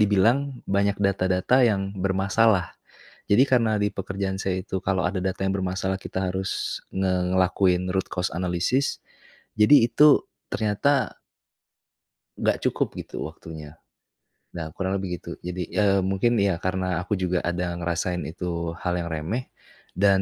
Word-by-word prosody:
dibilang, 120 Hz, +7 st, +2 dB
banyak 100 Hz, +1 st, +1 dB
data-data 95 Hz, +4 st, +2 dB
yang 100 Hz, -4 st, +1 dB
bermasalah. 95 Hz, 0 st, +2 dB, 0.6 s
Jadi 120 Hz, +6 st, +6 dB
karena 115 Hz, -4 st, +2 dB
di 105 Hz, -, +2 dB
pekerjaan 95 Hz, 0 st, -3 dB
saya 95 Hz, -1 st, -2 dB
itu 95 Hz, -2 st, -3 dB
kalau 95 Hz, -2 st, +1 dB
ada 95 Hz, 0 st, -3 dB
data 95 Hz, 0 st, -2 dB
yang 95 Hz, +1 st, 0 dB
bermasalah 95 Hz, 0 st, -1 dB
kita 95 Hz, -1 st, -3 dB
harus 95 Hz, +1 st, -3 dB
ngelakuin 90 Hz, 0 st, +1 dB
root 95 Hz, 0 st, 0 dB
cause 90 Hz, +1 st, 0 dB
analysis, 90 Hz, +10 st, 0 dB, 0.6 s
jadi 115 Hz, +3 st, +6 dB
itu 150 Hz, +4 st, +5 dB, 0.3 s
ternyata 115 Hz, +5 st, +1 dB, 1.2 s
nggak -, -, +1 dB
cukup -, -, -2 dB
gitu -, -, -6 dB
waktunya, 80 Hz, -1 st, -10 dB, 0.7 s
nah 80 Hz, -2 st, -5 dB
kurang 95 Hz, +1 st, -1 dB
lebih 90 Hz, -2 st, -3 dB
gitu. -, -, -8 dB
Jadi, 90 Hz, -1 st, -5 dB
eee, 100 Hz, -2 st, +3 dB
mungkin 105 Hz, +5 st, +1 dB
iya, 95 Hz, -4 st, +1 dB
karena 95 Hz, -2 st, -1 dB
aku 100 Hz, +3 st, -2 dB
juga 90 Hz, -1 st, 0 dB
ada 90 Hz, 0 st, -2 dB
ngerasain 85 Hz, +1 st, -1 dB
itu 85 Hz, 0 st, -4 dB
hal 90 Hz, -1 st, 0 dB
yang 85 Hz, -, -4 dB
remeh 85 Hz, +11 st, -3 dB, 0.5 s
dan 95 Hz, 0 st, +4 dB
95 Hz, 140 wpm, -25 LUFS, 90-100 Hz, 1.2 s, Jadi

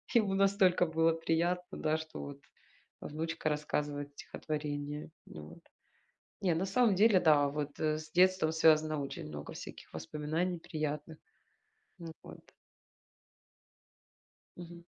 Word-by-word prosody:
Ему 210 Hz, -4 st, +4 dB
настолько 195 Hz, -2 st, +4 dB
было 160 Hz, +1 st, +3 dB
приятно, 170 Hz, +2 st, -1 dB
да, 155 Hz, 0 st, +1 dB
что 160 Hz, 0 st, -8 dB
вот 140 Hz, -1 st, -8 dB, 0.6 s
внучка 160 Hz, +1 st, -3 dB
рассказывает 150 Hz, -1 st, -2 dB
стихотворение. 150 Hz, 0 st, -5 dB, 0.2 s
Вот. 75 Hz, 0 st, -11 dB, 0.8 s
Не, 180 Hz, -4 st, +2 dB
на 175 Hz, -, 0 dB
самом 215 Hz, +2 st, +3 dB
деле, 205 Hz, -1 st, +5 dB
да, 150 Hz, -4 st, +5 dB
вот, 145 Hz, 0 st, -4 dB
э, 155 Hz, -1 st, +1 dB
с 155 Hz, 0 st, -10 dB
детством 185 Hz, -2 st, +4 dB
связано 155 Hz, -1 st, +4 dB
очень 135 Hz, -, -6 dB
много 75 Hz, -1 st, -7 dB
всяких -, -, -10 dB
воспоминаний 155 Hz, -, -2 dB
приятных. 155 Hz, -1 st, -4 dB, 0.8 s
Ну 165 Hz, -1 st, -8 dB
вот. -, -, -11 dB, 2.2 s
Мгм. 175 Hz, -1 st, -10 dB
155 Hz, 115 wpm, -32 LUFS, 150-175 Hz, 2.2 s, деле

